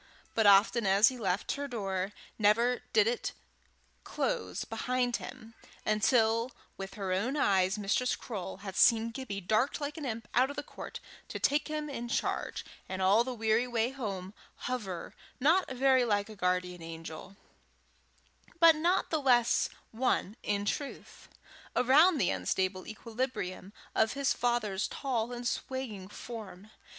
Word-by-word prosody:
But, 225 -2 +3
often 200 +2 +5
as 195 +3 +6
he 260 - -7
left 190 -2 -1
her 285 0 -3
door, 195 -6 -2 0.3
never 230 +4 +3
did 215 -2 +5
it 235 +2 -1 0.7
close - - -2
behind 245 +2 -1
him 225 +1 -10 0.3
until 225 +2 +2 0.2
with 195 0 -7
her 195 -3 -2
own 235 +10 0
eyes 190 -6 +3
Mistress 210 +5 +1
Croale 195 -5 -6
had 190 -2 -6
seen 230 -1 +5
Gibbie 225 -5 -5
dart 215 +8 +1
like 290 0 -4
an 305 - -5
imp 225 -3 -4
out 255 +3 +4
of 285 - -6
the 290 - -4
court - - -8 0.3
to - - -5
take 290 +1 +1
him 305 -1 -3
in 240 -4 -5
charge, - - -2 0.2
and, 190 - -4
all 195 +5 +5
the 260 - -4
weary 225 +2 +2
way 235 0 0
home, 200 -8 -5 0.3
hover, 210 -9 -4 0.3
not 325 +8 +3
very 260 0 +3
like 205 -3 0
a 215 - -9
guardian 180 -2 -1
angel, 165 +3 -8 1.2
but 330 -1 +8
not 345 +5 +1
the 315 -2 +1
less 240 -3 +3 0.2
one 225 -3 0
in 205 0 -1
truth, 280 +7 -5 0.5
around 305 +8 +5
the 195 - +2
unstable 185 - -1
equilibrium 215 -5 -4 0.2
of 220 +1 +2
his 275 0 +1
father's 220 -5 0
tall 245 -4 -2
and 240 0 -4
swaying 240 -10 -4
form. 210 -2 -9
225 Hz, 150 wpm, -31 LUFS, 195-255 Hz, 1.2 s, but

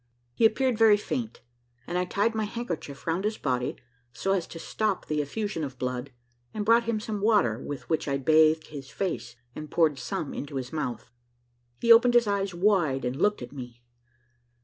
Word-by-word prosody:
He 225 - +5
appeared 250 0 0
very 220 -2 +7
faint, 230 +2 -4 0.4
and 175 - -5
I 180 0 +1
tied 205 +5 0
my 220 -1 -1
handkerchief 180 - -6
round 170 +3 0
his 215 +1 -1
body, 125 -2 -1 0.4
so 190 +11 -2
as 180 -4 -1
to - - -9
stop 210 +3 -2
the 150 -1 0
effusion 200 +3 -3
of 135 -3 -6
blood, 125 +1 -3 0.5
and 210 -1 -2
brought 230 +2 +5
him 225 -2 0
some 210 -2 -4
water, 200 - +3
with 145 +1 -7
which 160 -2 -1
I 140 -1 0
bathed 155 +3 +4
his 140 -3 -8
face, 185 -9 -4 0.2
and 155 +2 -8
poured 155 -4 +2
some 190 -7 -4
into 140 0 -6
his 130 0 -4
mouth. 125 -6 -4 0.7
He 235 0 +7
opened 240 +1 +5
his 240 -1 +6
eyes 200 -1 0
wide, 175 -8 +1
and 125 +1 -1
looked 210 +8 +1
at - - -9
me. 120 -3 -9
175 Hz, 190 wpm, -27 LUFS, 140-215 Hz, 0.7 s, very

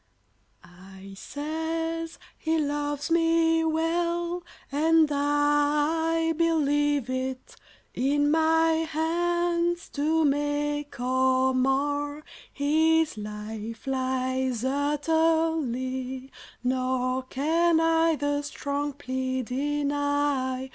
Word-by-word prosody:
I 190 +2 -13
says 325 +5 -4 0.2
he 320 0 -1
loves 290 0 -2
me 330 0 +3
well, 340 +2 0 0.3
and 320 +2 +4
I 295 +3 +1
Believe 290 -4 +1
it; 255 0 -4 0.4
in 290 +3 +1
my 320 0 +3
hands, 345 +2 0
to 310 +2 +1
make 290 0 -1
Or 260 +1 +2
mar, 290 +3 0 0.3
his 320 +2 +2
life 215 +2 -7
lies 260 -2 -1
utterly, 285 -3 0 0.3
Nor 255 0 0
can 320 +6 +1
I 325 0 +3
the 290 0 -1
strong 290 0 -3
plea 260 -1 -3
deny. 285 0 -1
290 Hz, 80 wpm, -26 LUFS, 260-320 Hz, 0.4 s, and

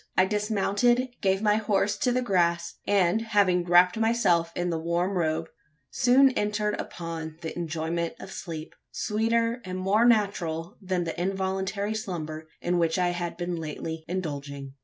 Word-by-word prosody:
I 185 - +6
dismounted, 210 +4 +1
gave 195 +1 +1
my 210 0 +4
horse 205 -1 +1
to 250 - +1
the 250 +1 +1
grass; 170 -5 +1
and, 195 +1 +3
having 200 -6 +2
wrapped 180 +2 +5
myself 225 -8 +2
in 175 0 -1
the 165 - -1
warm 170 +3 0
robe, 160 -2 0 0.5
soon 265 +2 +5
entered 210 -2 0
upon 165 -2 -6
the 160 - -5
enjoyment 165 0 -2
of 190 - -9
sleep 160 -5 -7 0.2
sweeter 230 +2 0
and 185 0 -5
more 195 +4 +2
natural 185 -8 +1
than 185 -2 -1
the 170 +1 -4
involuntary 195 +2 -1
slumber 160 -7 -5
in 175 0 +1
which 165 0 +1
I 180 -1 +2
had 175 -1 -3
been 175 0 -3
lately 160 0 -5
indulging. 140 -6 -5
185 Hz, 155 wpm, -27 LUFS, 170-210 Hz, 0.5 s, I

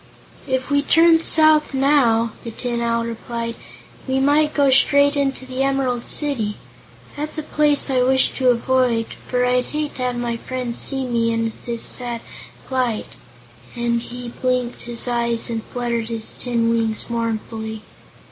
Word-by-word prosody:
"If 260 +1 -2
we 285 0 +3
turn 325 +2 +5
south 310 -3 +5
now," 255 -5 +3
the 230 - -5
Tin 235 +1 -4
Owl 235 0 0
replied, 230 0 -5 0.5
"we 265 0 +1
might 295 +2 +2
go 280 -2 +4
straight 285 +2 +5
into 275 -2 -1
the 260 0 -4
Emerald 270 -3 0
City. 240 -9 -1 0.6
That's 300 +2 -3
a 310 - -2
place 295 -1 +2
I 255 -1 +2
wish 260 +1 +3
to 255 -2 +3
avoid, 245 -1 +2 0.2
for 250 0 +1
I'd 250 0 +1
hate 300 -1 -4
to - - -6
have 250 -1 -1
my 240 -1 -2
friends 250 -1 -4
see 270 -1 0
me 230 -2 0
in 230 0 -1 0.2
this 235 -1 -1
sad 240 -2 -1 0.5
plight," 250 -4 -1 0.7
and 235 -1 0
he 245 +1 -8
blinked 250 0 -2
his 240 +1 -4
eyes 235 -1 0
and 225 -1 -2
fluttered 235 -2 -3
his 225 -1 -2
tin 235 -2 -1
wings 225 -1 0
mournfully. 220 -1 -4
245 Hz, 155 wpm, -20 LUFS, 235-270 Hz, 0.7 s, turn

